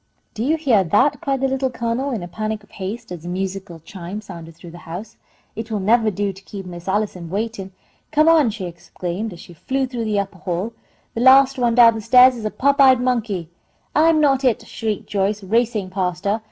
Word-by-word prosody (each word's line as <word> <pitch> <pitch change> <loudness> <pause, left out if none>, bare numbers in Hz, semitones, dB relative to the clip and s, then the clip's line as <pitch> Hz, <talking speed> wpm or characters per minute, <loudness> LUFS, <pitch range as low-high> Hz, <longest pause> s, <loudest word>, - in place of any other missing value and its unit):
"Do 220 - -3
you 310 +5 +1
heah 250 -11 +3
that?" 255 - +2
cried 270 -2 -1
the 270 - +2
Little 265 0 -1
Colonel, 240 +3 -2
in 230 -9 -3
a - - -6
panic 215 +3 -4
of 205 - -23
haste, 195 +2 -6
as 175 -3 -6
the 175 - -7
musical 190 -1 -4
chime 180 +4 -7
sounded 170 -5 -10
through 170 +1 -12
the 175 - -11
house. 210 +7 -7 0.4
"It 225 +1 -6
will 215 -2 -2
nevah 220 +3 +3
do 200 0 -2
to 195 - -14
keep 195 0 -9
Miss 175 0 -9
Allison 190 -4 -2
waitin'! 200 0 -3 0.4
Come 310 +1 +3
on!" 320 -6 +5
she 210 -3 -5
exclaimed, 175 +3 -5
adding, 210 - -7
as 170 - -12
she 175 - -13
flew 265 - -2
through 245 -3 -4
the 210 -2 0
upper 195 -2 -5
hall, 185 +6 -3 0.4
"The 230 - -3
last 265 +1 +6
one 240 -2 +2
down 235 -2 +7
the 225 - -5
stairs 250 +3 +6
is 225 -2 -7
a - - 0
pop 280 +5 +2
eyed 260 -2 +7
monkey!" 220 -9 -1 0.4
"I'm 315 +1 +4
not 275 -3 +3
it!" 250 -4 +1
shrieked 215 -2 -4
Joyce, 200 +1 -1
racing 220 -1 0
past 180 -2 -2
her. 205 +3 +1
215 Hz, 220 wpm, -21 LUFS, 190-250 Hz, 0.4 s, down